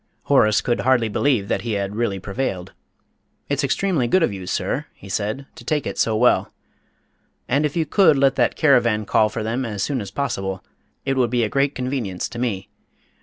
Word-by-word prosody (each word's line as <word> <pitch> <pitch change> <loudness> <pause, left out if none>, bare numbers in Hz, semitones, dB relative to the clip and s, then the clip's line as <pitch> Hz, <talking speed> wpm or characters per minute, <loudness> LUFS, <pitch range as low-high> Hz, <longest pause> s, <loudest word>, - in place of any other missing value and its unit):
'" - - -44
Horace 110 -1 +5
could 120 -2 0
hardly 125 -3 +2
believe 115 -3 +1
that 95 - -1
he 115 0 -3
had 100 0 -2
really 110 -4 -1
prevailed. 95 -2 -4 0.8
"It's 140 0 0
extremely 140 0 +1
good 185 +8 +3
of 120 - +1
you, 95 -2 -7
sir," - - -2
he 100 - -13
said, 105 +7 -3
"to - - -13
take 150 +3 -1
it - - -3
so 110 - +2
well. 120 +2 +3 1.0
And 145 +4 +2
if 145 - -10
you 165 -2 +1
could 170 -3 +4
let 135 -1 +4
that 120 -3 +1
caravan 120 -8 +3
call 110 +1 +3
for 105 - -4
them 115 +4 -2
as 105 -5 -3
soon 135 -1 -1
as 100 - -6
possible, 95 -6 -3 0.4
it 135 -1 0
would 125 -2 +2
be 120 0 +1
a 110 - 0
great 140 +3 +1
convenience 125 -8 -3
to 120 - -7
me. 105 -7 -2
120 Hz, 205 wpm, -22 LUFS, 105-135 Hz, 1.0 s, Horace